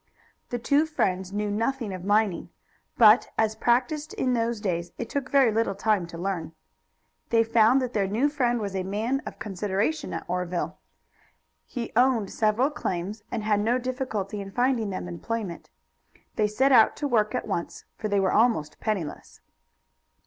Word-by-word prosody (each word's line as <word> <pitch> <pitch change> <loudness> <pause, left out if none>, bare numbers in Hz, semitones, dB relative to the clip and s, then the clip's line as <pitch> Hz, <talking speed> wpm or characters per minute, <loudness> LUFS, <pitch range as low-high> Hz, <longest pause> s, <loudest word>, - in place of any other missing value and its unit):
The 245 - -2
two 285 +6 +2
friends 190 -11 -1
knew 205 0 -2
nothing 230 0 -1
of 185 -1 -7
mining, 205 -1 +1 0.5
but 220 0 +7
as 220 -1 +2
practiced 255 +7 0
in 255 -1 0
those 230 -1 0
days 175 -4 -2
it 235 - -5
took 275 -2 -2
very 270 -5 +4
little 225 -2 0
time 200 -3 +1
to 170 - -9
learn. 170 -3 -3 0.8
They 230 -1 +4
found 230 +3 +4
that 250 -1 -4
their 200 -3 +1
new 225 +9 +1
friend 245 -5 0
was 200 -3 -4
a 190 - 0
man 220 +8 -1
of - - -7
consideration 210 - -2
at - - -5
Oreville. 180 0 -3 0.9
He 240 -3 -5
owned 240 -5 +3
several 225 +6 +2
claims, 195 -5 -4
and 230 -3 -3
had 210 -1 +2
no 230 +4 +2
difficulty 250 -6 -3
in 195 - -7
finding 245 0 +1
them 185 -2 -4
employment. 185 +1 -5 0.7
They 215 - +2
set 235 +2 +4
to 290 - -2
work 220 -3 +1
at 250 - -3
once, 175 -5 -4
for 215 - -4
they 205 -1 +1
were 190 -1 +1
almost 210 -10 +2
penniless. 195 -9 -4
215 Hz, 165 wpm, -26 LUFS, 195-245 Hz, 0.9 s, but